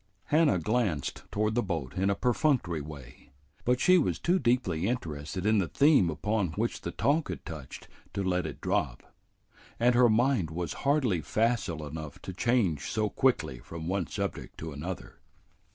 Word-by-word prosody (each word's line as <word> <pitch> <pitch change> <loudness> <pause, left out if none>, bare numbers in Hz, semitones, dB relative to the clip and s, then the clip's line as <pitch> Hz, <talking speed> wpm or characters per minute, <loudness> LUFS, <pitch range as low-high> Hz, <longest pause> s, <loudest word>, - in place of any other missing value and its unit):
Hannah 150 - +3
glanced 100 - -1
toward 105 +1 0
the 120 - +2
boat 80 - -3
in 95 +2 +1
a 100 - +2
perfunctory 120 - +1
way, 70 -3 -11 0.4
but 125 +1 +2
she 180 +6 +6
was 155 - 0
too 180 +2 +2
deeply 100 - +1
interested 85 -6 -3
in 110 0 +4
the 90 - 0
theme 140 - +4
upon 100 +1 -1
which 115 +3 -2
the - - -4
talk 150 +3 +1
had - - -6
touched 80 -7 -8 0.3
to 100 - -1
let 90 -1 0
it - - -8
drop, - - -1 0.8
and 120 +1 +4
her 120 0 +5
mind 115 - +2
was 85 +1 -3 0.2
hardly 125 - +2
facile 105 - 0
enough 75 0 -7
to 95 - -6
change 100 - +1
so 110 -1 0
quickly 80 - +1
from 80 +3 -7
one 95 -2 -1
subject - - -4
to 80 0 -6
another. 85 +6 -6
100 Hz, 170 wpm, -29 LUFS, 80-120 Hz, 0.8 s, she